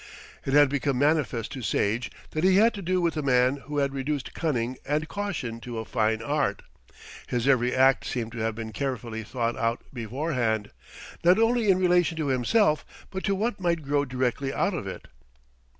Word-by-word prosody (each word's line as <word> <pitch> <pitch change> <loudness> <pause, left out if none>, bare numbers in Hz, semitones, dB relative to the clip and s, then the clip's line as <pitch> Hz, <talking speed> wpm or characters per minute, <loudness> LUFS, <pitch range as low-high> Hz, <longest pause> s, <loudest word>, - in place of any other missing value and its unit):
It 135 - 0
had 145 0 +7
become 140 -1 -1
manifest 140 -5 +1
to 135 -2 -6
Sage 115 +1 0 0.2
that 155 - -2
he 190 0 +5
had 225 +4 +5
to 200 - -6
do 185 0 0
with 170 -2 +1
a - - 0
man 130 0 +3
who 145 +2 -6
had 140 -1 +1
reduced 140 0 -3
cunning 130 -6 -1
and 150 +2 -1
caution 165 - -4
to 115 +1 -7
a 110 - -4
fine 110 -1 0
art. 145 +2 0 0.6
His 120 +1 -1
every 125 -2 +3
act 135 +1 +4
seemed 115 -3 -3
to 115 - -7
have 110 0 -1
been 110 -1 -6
carefully 120 -3 -3
thought 115 +1 -2
out 115 +1 -1
beforehand, 120 -3 -2 0.5
not 180 +3 +6
only 225 -1 +3
in 190 - +5
relation 180 -2 +2
to 155 -3 -1
himself, 150 - +2 0.3
but 190 -1 -4
to 195 - +1
what 210 +2 -1
might 170 -3 0
grow 145 0 +1
directly 130 0 -1
out - - 0
of - - -4
it. - - -7
135 Hz, 190 wpm, -26 LUFS, 120-165 Hz, 0.6 s, had